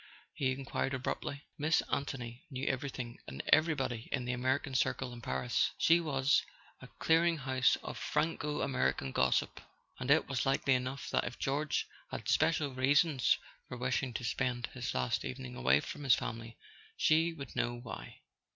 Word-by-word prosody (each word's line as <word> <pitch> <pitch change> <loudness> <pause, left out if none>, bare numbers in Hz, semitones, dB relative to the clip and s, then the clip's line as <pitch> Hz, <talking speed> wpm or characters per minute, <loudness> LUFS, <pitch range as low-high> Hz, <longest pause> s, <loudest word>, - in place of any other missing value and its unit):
he 130 -2 0
enquired 135 0 -2
abruptly. 140 +2 -3 0.2
Miss 155 +2 +3
Anthony 125 -3 -3
knew 135 -1 -4
everything 125 -3 -3
and 70 0 -6
everybody 135 -8 +2
in 125 -3 -1
the 125 - -1
American 130 +2 0
circle 130 -1 0
in 120 - -9
Paris; 65 - 0
she 165 +1 +5
was 140 -4 +2 0.4
a - - -10
clearing 165 +1 +3
house 130 -2 +3
of - - -6
Franco 150 -1 -1
American 130 - 0
gossip, 65 0 +1 0.4
and 125 +1 -4
it 155 +3 +5
was 135 -3 -1
likely 135 0 +2
enough 130 +2 -2
that - - +1
if - - -5
George 145 +3 0 0.2
had - - -6
special 155 -3 +2
reasons 135 +1 +3 0.3
for 125 - -6
wishing 125 +1 0
to - - -3
spend 120 +1 -1
his 125 -2 -4
last 65 -1 0
evening 65 -1 -6
away 65 +2 +4
from 145 - -7
his 135 -3 +6
family 115 0 -6 0.4
she 160 +2 +4
would 140 -5 -9
know 120 -1 0
why. 120 -1 -9
130 Hz, 160 wpm, -33 LUFS, 120-145 Hz, 0.4 s, his